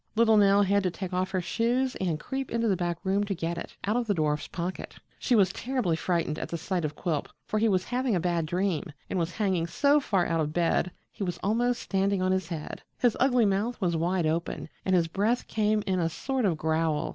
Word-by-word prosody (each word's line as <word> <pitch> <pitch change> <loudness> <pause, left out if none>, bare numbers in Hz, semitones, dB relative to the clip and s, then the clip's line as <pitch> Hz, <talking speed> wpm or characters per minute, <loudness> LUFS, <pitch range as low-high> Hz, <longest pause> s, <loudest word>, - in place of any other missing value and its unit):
Little 225 0 +5
Nell 200 -1 +5
had 200 +1 +3
to 185 - 0
take 185 +1 -6
off 185 +1 0
her 185 -1 -1
shoes 240 +8 0
and 170 -5 -1
creep 270 +5 -4
into 230 0 0
the 200 - +3
back 175 -1 -2
room 195 +1 +1
to 200 -1 -2
get 170 0 -3
it - - -9
out 210 +3 +1
of 245 -1 0
the 205 - +1
dwarf's 150 -2 0
pocket. 180 +1 -5 0.2
She 250 - +2
was 195 -3 +4
terribly 245 -10 -1
frightened 165 -2 -1
at - - -5
the 170 - -3
sight 180 +1 -2
of 150 0 -3
Quilp, 155 -4 -2 0.2
for 215 - -1
he 225 +1 +3
was 185 -2 +2
having 250 -1 0
a - - +2
bad 170 -2 0
dream, 180 -1 0 0.3
and 185 - 0
was 170 +1 -1
hanging 190 -6 0
so 285 - +3
far 195 -10 +1
out 165 -1 0
of 150 0 -2
bed 170 -1 +2
that 180 - -9 0.2
he - - -5
was 175 -2 -2
almost 240 +4 +1
standing 195 0 +1
on 185 0 +1
his 185 -2 0
head; 160 -3 -6 0.2
his 245 -3 +2
ugly 250 -3 +4
mouth 205 +5 0
was 175 -4 0
wide 175 +1 +1
open, 160 0 -2 0.2
and 190 - +3
his 170 -2 +3
breath 210 +8 0
came 215 -1 +1
in 190 -2 0
a 165 -1 +1
sort 265 - -2
of 175 -5 +1
growl. 160 -1 0
190 Hz, 240 wpm, -28 LUFS, 170-215 Hz, 0.3 s, Little